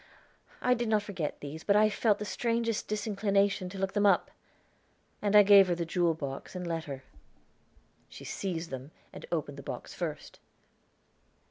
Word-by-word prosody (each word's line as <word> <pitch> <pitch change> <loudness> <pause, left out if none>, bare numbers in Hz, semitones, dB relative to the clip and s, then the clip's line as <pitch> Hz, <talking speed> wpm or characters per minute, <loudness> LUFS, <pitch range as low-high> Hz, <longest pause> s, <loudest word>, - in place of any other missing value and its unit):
I 250 - +4
did 240 -1 -1
not 215 -2 +2
forget 180 -8 -4
these, 150 +3 -7
but 200 - +3
I 215 +1 +6
felt 215 0 +2
the 210 - -5
strangest 230 +1 -1
disinclination 200 -2 0
to 195 - -8
look 195 0 -2
them 205 -1 +3
up." 200 - +3 0.9
And 205 0 +1
I 210 - +10
gave 200 -1 +8
her 175 - +1
the 170 0 -2
jewel 170 -1 +1
box 140 +2 -6
and 180 -1 -4
letter. 160 -5 -4 1.1
She - - -11
seized 175 -5 -4
them, 130 +1 -6 0.2
and - - -9
opened 145 -4 -3
the - - -6
box - - -7
first. - - -6
195 Hz, 165 wpm, -30 LUFS, 165-210 Hz, 1.1 s, I